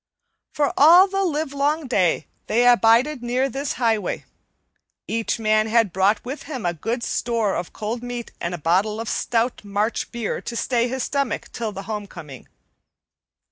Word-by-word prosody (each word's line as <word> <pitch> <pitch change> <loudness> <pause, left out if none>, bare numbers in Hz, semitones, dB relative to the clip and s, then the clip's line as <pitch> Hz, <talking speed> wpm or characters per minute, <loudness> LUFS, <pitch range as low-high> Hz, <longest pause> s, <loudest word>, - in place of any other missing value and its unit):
For 290 -1 +1
all 345 +7 +8
the 390 0 -1
livelong 300 -2 -1
day 185 -10 +1 0.2
they 240 +3 +2
abided 240 +4 +4
near 250 +2 0
this 275 +3 -3
highway. 225 -5 -1 0.8
Each 225 0 -1
man 215 -1 +2
had 220 -4 +2
brought 200 +4 +2
with 270 +4 -5
him 260 -10 -5
a 175 - +1
good 230 - -3
store 230 -5 0
of 175 - -4
cold 220 +3 -4
meat 245 -1 -6
and 170 +1 -2
a - - -6
bottle 190 +7 +1
of 225 - -5
stout 235 +2 -1
March 205 +3 -2
beer 235 -3 -3
to 235 - -6
stay 240 0 +1
his 260 0 -3
stomach 280 -2 -2
till 225 -2 -4
the 195 -1 -7
homecoming. 195 - -8
230 Hz, 160 wpm, -22 LUFS, 210-260 Hz, 0.8 s, all